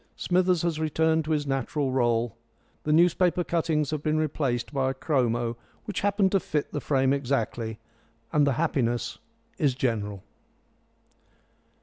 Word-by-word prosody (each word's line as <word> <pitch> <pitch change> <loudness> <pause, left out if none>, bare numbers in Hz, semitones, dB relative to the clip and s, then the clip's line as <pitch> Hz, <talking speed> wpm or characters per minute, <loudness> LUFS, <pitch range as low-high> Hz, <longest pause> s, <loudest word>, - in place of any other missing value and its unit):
Smithers 180 -1 +2
has 165 -2 0
returned 160 0 +1
to 160 - -3
his 150 -2 +1
natural 135 +1 -1
rôle. 120 -2 +1 0.5
The 150 - +1
newspaper 175 +2 +3
cuttings 160 -4 0
have 155 -2 -2
been 155 +1 0
replaced 140 -5 -1
by 135 -1 +1
a 135 - -3
chromo 120 -5 0 0.3
which 210 - -3
happened 200 -1 +2
to 195 - +3
fit 150 -4 -2
the 145 - -3
frame 135 -1 +2
exactly, 120 -5 -2 0.6
and 145 -1 +4
the 140 - +3
happiness 120 -6 -1 0.4
is 140 -4 +2
general. 105 -6 -2
145 Hz, 140 wpm, -27 LUFS, 125-160 Hz, 0.6 s, and